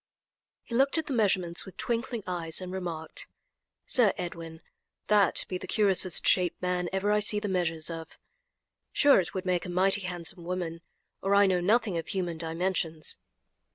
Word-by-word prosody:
He 235 Hz, -, -10 dB
looked 270 Hz, +6 st, +3 dB
at 320 Hz, -, 0 dB
the 280 Hz, -, -3 dB
measurements 185 Hz, -7 st, +1 dB
with 190 Hz, -, -12 dB
twinkling 235 Hz, -1 st, -2 dB
eyes, 170 Hz, -3 st, -2 dB
and 185 Hz, -1 st, -6 dB
remarked: 170 Hz, -4 st, -5 dB, 0.6 s
"Sir 230 Hz, -6 st, +4 dB
Edwin, 165 Hz, -3 st, -6 dB, 0.5 s
that 210 Hz, -1 st, +3 dB
be 185 Hz, -, -4 dB
the -, -, -8 dB
curiousest 190 Hz, -4 st, +2 dB
shaped 180 Hz, -2 st, +3 dB
man 180 Hz, -1 st, -1 dB
ever 195 Hz, +2 st, 0 dB
I 210 Hz, -, +3 dB
see 210 Hz, 0 st, +4 dB
the 210 Hz, -, -3 dB
measures 170 Hz, -4 st, -1 dB
of. 165 Hz, -1 st, -7 dB, 0.7 s
Sure 285 Hz, -5 st, +5 dB
it 180 Hz, -, -3 dB
would 185 Hz, -, -3 dB
make 180 Hz, -2 st, 0 dB
a -, -, -6 dB
mighty 190 Hz, +3 st, +2 dB
handsome 180 Hz, -1 st, -6 dB
woman, 170 Hz, -2 st, -4 dB, 0.4 s
or 195 Hz, +1 st, +2 dB
I 200 Hz, 0 st, +6 dB
know 185 Hz, -2 st, +2 dB
nothing 205 Hz, -1 st, +2 dB
of 165 Hz, -, -7 dB
human 175 Hz, -4 st, -3 dB
dimensions." 165 Hz, -1 st, -2 dB
185 Hz, 170 wpm, -28 LUFS, 170-205 Hz, 0.7 s, I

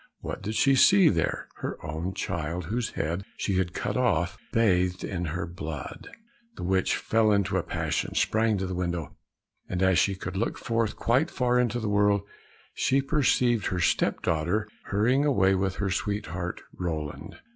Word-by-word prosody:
What -, -, -5 dB
did 110 Hz, +2 st, -4 dB
she 135 Hz, -, +4 dB
see 190 Hz, +6 st, +6 dB
there? 85 Hz, -4 st, -1 dB
Her -, -, -4 dB
own 80 Hz, +4 st, -4 dB
child, 85 Hz, +1 st, -3 dB
whose 115 Hz, +6 st, -2 dB
head 85 Hz, +5 st, -2 dB
she 95 Hz, -2 st, 0 dB
had 85 Hz, -2 st, -2 dB
cut -, -, -2 dB
off, 90 Hz, -9 st, +1 dB, 0.2 s
bathed 90 Hz, -5 st, +2 dB
in 90 Hz, -3 st, -3 dB
her 85 Hz, +2 st, -3 dB
blood. 80 Hz, -4 st, -7 dB, 0.5 s
The -, -, -7 dB
witch 95 Hz, +1 st, +1 dB
fell 110 Hz, -1 st, +2 dB
into 100 Hz, -1 st, +1 dB
a 95 Hz, -, +2 dB
passion, -, -, -2 dB
sprang 110 Hz, -1 st, +2 dB
to 95 Hz, -, -2 dB
the 95 Hz, -, -4 dB
window, 85 Hz, -4 st, -3 dB, 0.5 s
and 90 Hz, 0 st, -1 dB
as 95 Hz, -2 st, +4 dB
she 100 Hz, -, +2 dB
could 95 Hz, 0 st, -6 dB
look 110 Hz, +5 st, -1 dB
forth 115 Hz, -2 st, -1 dB
quite 130 Hz, +8 st, +2 dB
far 125 Hz, -5 st, +1 dB
into 120 Hz, -1 st, +1 dB
the 110 Hz, -, -3 dB
world, 105 Hz, -1 st, +3 dB, 0.5 s
she 135 Hz, -, +2 dB
perceived 130 Hz, -, +2 dB
her 90 Hz, -, -1 dB
step 85 Hz, -, +1 dB
daughter 85 Hz, +7 st, 0 dB, 0.2 s
hurrying 120 Hz, +8 st, +2 dB
away 100 Hz, -10 st, +3 dB
with 95 Hz, 0 st, 0 dB
her 100 Hz, -2 st, -1 dB
sweetheart 95 Hz, -3 st, -3 dB
Roland. 80 Hz, -4 st, -4 dB
95 Hz, 170 wpm, -27 LUFS, 90-115 Hz, 0.5 s, see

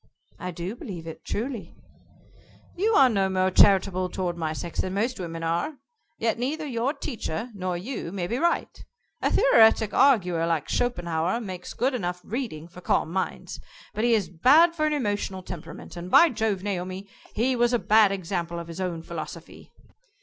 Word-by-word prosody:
"I 180 Hz, -, -4 dB
do 175 Hz, +4 st, -5 dB
believe 180 Hz, -8 st, -8 dB
it, 160 Hz, -, -9 dB
truly." 225 Hz, -6 st, -4 dB, 1.0 s
"You 430 Hz, +5 st, +1 dB
are 270 Hz, -, +7 dB
no 195 Hz, -5 st, +1 dB
more 185 Hz, 0 st, +1 dB
charitable 185 Hz, -1 st, +4 dB
toward 180 Hz, -2 st, -2 dB
my 160 Hz, -2 st, -2 dB
sex 165 Hz, +1 st, -4 dB
than 185 Hz, +1 st, -3 dB
most 230 Hz, +4 st, -1 dB
women 165 Hz, -2 st, -5 dB
are. 170 Hz, -, -1 dB, 0.4 s
Yet 230 Hz, 0 st, 0 dB
neither 300 Hz, +6 st, -2 dB
your 250 Hz, -1 st, -1 dB
teacher 230 Hz, -, -4 dB
nor 185 Hz, -3 st, -3 dB
you 205 Hz, -2 st, -5 dB
may 185 Hz, -2 st, -3 dB
be 235 Hz, +8 st, -2 dB
right. 340 Hz, +1 st, -1 dB, 0.4 s
A -, -, +2 dB
theoretic 225 Hz, -, +5 dB
arguer 180 Hz, -11 st, +3 dB
like 165 Hz, -3 st, 0 dB
Schopenhauer 175 Hz, -4 st, 0 dB
makes 185 Hz, -5 st, -7 dB
good 260 Hz, +2 st, +1 dB
enough 180 Hz, -7 st, -2 dB
reading 210 Hz, -, -5 dB
for 175 Hz, +1 st, -13 dB
calm 165 Hz, -, 0 dB
minds, 190 Hz, 0 st, -3 dB, 0.3 s
but 215 Hz, -, -2 dB
he 235 Hz, -1 st, +4 dB
is 205 Hz, -5 st, 0 dB
bad 290 Hz, -, +5 dB
for 310 Hz, -2 st, +1 dB
an 305 Hz, -, 0 dB
emotional 205 Hz, -7 st, -2 dB
temperament, 175 Hz, -3 st, -9 dB
and, 175 Hz, +1 st, -7 dB
by 335 Hz, -, +7 dB
Jove, 220 Hz, -5 st, -1 dB
Naomi, 185 Hz, 0 st, -4 dB, 0.3 s
he 255 Hz, +4 st, +1 dB
was 240 Hz, 0 st, +2 dB
a 240 Hz, -, +3 dB
bad 215 Hz, -2 st, +4 dB
example 175 Hz, -3 st, -3 dB
of 170 Hz, 0 st, -7 dB
his 170 Hz, +3 st, -6 dB
own 170 Hz, -3 st, -3 dB
philosophy." 165 Hz, 0 st, -8 dB
190 Hz, 175 wpm, -26 LUFS, 175-240 Hz, 1.0 s, are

